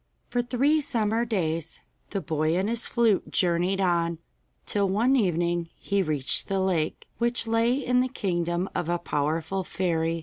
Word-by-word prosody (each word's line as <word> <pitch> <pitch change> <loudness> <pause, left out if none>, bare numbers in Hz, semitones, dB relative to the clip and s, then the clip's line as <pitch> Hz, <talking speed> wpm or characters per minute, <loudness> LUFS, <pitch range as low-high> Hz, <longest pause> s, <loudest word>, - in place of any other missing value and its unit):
For 245 - +1
three 265 +6 +2
summer 230 -5 0
days 165 -7 -2 0.3
the 195 - -2
boy 155 +1 0
and 190 +2 +1
his 235 +1 -2
flute 230 -5 +2
journeyed 180 +2 +1
on, 170 -3 +1 0.5
till 200 -2 +1
one 235 +8 +3
evening 175 -6 +1
he 200 -1 0
reached 150 -6 -1
the 195 -1 0
lake, 180 -5 -1
which 235 -1 +1
lay 230 +2 +2
in 250 -2 +1
the 255 - +2
kingdom 175 -6 -1
of 170 - -2
a 175 - +2
powerful 160 +3 -1
fairy. 165 -2 -1
190 Hz, 160 wpm, -26 LUFS, 170-230 Hz, 0.5 s, one